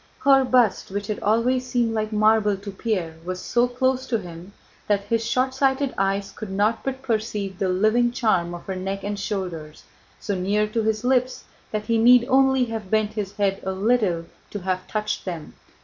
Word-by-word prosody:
Her 270 Hz, -1 st, +5 dB
bust, 250 Hz, -5 st, +2 dB
which 200 Hz, +1 st, -4 dB
had 210 Hz, +1 st, -3 dB
always 235 Hz, +4 st, +1 dB
seemed 240 Hz, -3 st, 0 dB
like 215 Hz, 0 st, -2 dB
marble 215 Hz, -1 st, +3 dB
to 200 Hz, +1 st, -8 dB
Pierre, 190 Hz, -6 st, -3 dB
was 185 Hz, +1 st, -4 dB
so 240 Hz, +5 st, +1 dB
close 260 Hz, +1 st, 0 dB
to 235 Hz, -, +1 dB
him 175 Hz, -1 st, -9 dB, 0.4 s
that 205 Hz, -1 st, +2 dB
his 225 Hz, +3 st, -1 dB
shortsighted 265 Hz, +3 st, +1 dB
eyes 195 Hz, +1 st, -1 dB
could 220 Hz, -, -8 dB
not 205 Hz, +4 st, 0 dB
but 265 Hz, 0 st, -4 dB
perceive 215 Hz, -5 st, -2 dB
the 190 Hz, -, 0 dB
living 215 Hz, +6 st, +2 dB
charm 185 Hz, -8 st, 0 dB
of 175 Hz, -, -10 dB
her 190 Hz, -, -4 dB
neck 195 Hz, +1 st, -4 dB
and 205 Hz, 0 st, -3 dB
shoulders, 180 Hz, -7 st, -5 dB, 0.4 s
so 205 Hz, -, -3 dB
near 200 Hz, +3 st, +1 dB
to 225 Hz, +1 st, -1 dB
his 220 Hz, 0 st, -1 dB
lips 255 Hz, 0 st, +1 dB, 0.3 s
that 210 Hz, -1 st, -3 dB
he 230 Hz, +1 st, +1 dB
need 245 Hz, +1 st, +6 dB
only 265 Hz, -1 st, +4 dB
have 225 Hz, -4 st, -6 dB
bent 215 Hz, 0 st, +1 dB
his 205 Hz, -2 st, -4 dB
head 200 Hz, -1 st, 0 dB
a 190 Hz, -, -2 dB
little 195 Hz, -4 st, +1 dB, 0.2 s
to 205 Hz, -, -6 dB
have 185 Hz, 0 st, -2 dB
touched 215 Hz, 0 st, -2 dB
them. 170 Hz, -5 st, -6 dB
215 Hz, 190 wpm, -23 LUFS, 195-240 Hz, 0.4 s, need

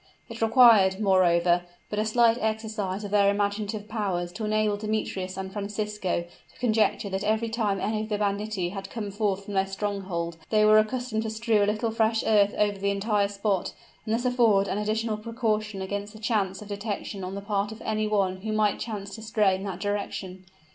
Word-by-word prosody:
It 230 Hz, 0 st, -8 dB
required, 220 Hz, -5 st, +6 dB
moreover, 175 Hz, -3 st, +3 dB, 0.3 s
but 210 Hz, -, -1 dB
a 215 Hz, -, +1 dB
slight 230 Hz, +1 st, +3 dB
exercise 215 Hz, -2 st, -2 dB
of 205 Hz, -, -6 dB
their 200 Hz, -1 st, +4 dB
imaginative 205 Hz, +1 st, -1 dB
powers 190 Hz, -6 st, -2 dB
to 220 Hz, -, -6 dB
enable 215 Hz, -1 st, +1 dB
Demetrius 205 Hz, -3 st, -3 dB
and 190 Hz, 0 st, -5 dB
Francisco 205 Hz, -3 st, -2 dB, 0.3 s
to -, -, -23 dB
conjecture 220 Hz, -3 st, +1 dB
that 190 Hz, +1 st, -2 dB
every 220 Hz, +2 st, +1 dB
time 215 Hz, -4 st, 0 dB
any 215 Hz, +1 st, -1 dB
of 215 Hz, -, -5 dB
the 210 Hz, -, 0 dB
banditti 205 Hz, -2 st, -1 dB
had 195 Hz, +1 st, -7 dB
come 210 Hz, -4 st, -5 dB
forth 200 Hz, -1 st, -1 dB
from 205 Hz, -, -7 dB
their 195 Hz, 0 st, +1 dB
stronghold 195 Hz, -4 st, -3 dB
they 215 Hz, -1 st, +4 dB
were 215 Hz, 0 st, +7 dB
accustomed 230 Hz, 0 st, -1 dB
to 220 Hz, -, -3 dB
strew 220 Hz, -1 st, +1 dB
a -, -, +1 dB
little 220 Hz, +2 st, -1 dB
fresh 225 Hz, 0 st, +1 dB
earth 205 Hz, -2 st, +4 dB
over 205 Hz, -1 st, +1 dB
the 200 Hz, +1 st, 0 dB
entire 200 Hz, 0 st, +1 dB
spot, 200 Hz, -2 st, -1 dB, 0.3 s
and 220 Hz, -, 0 dB
thus 240 Hz, +2 st, -2 dB
afford 230 Hz, -6 st, +3 dB
an 200 Hz, -, -1 dB
additional 215 Hz, +1 st, -1 dB
precaution 215 Hz, -3 st, -2 dB
against 205 Hz, +2 st, -4 dB
the 215 Hz, -, -11 dB
chance 210 Hz, -3 st, -1 dB
of 210 Hz, -, -13 dB
detection 205 Hz, -1 st, -4 dB
on 185 Hz, +1 st, -5 dB
the -, -, -3 dB
part 200 Hz, 0 st, -1 dB
of 220 Hz, -, -9 dB
any 215 Hz, 0 st, 0 dB
one 195 Hz, -3 st, +1 dB
who 215 Hz, +3 st, -5 dB
might 215 Hz, -1 st, +1 dB
chance 200 Hz, -4 st, -5 dB
to 220 Hz, -, -8 dB
stray 215 Hz, -3 st, +2 dB
in 190 Hz, +1 st, -3 dB
that 190 Hz, -3 st, -5 dB
direction. 195 Hz, -2 st, -4 dB
210 Hz, 200 wpm, -26 LUFS, 195-220 Hz, 0.3 s, were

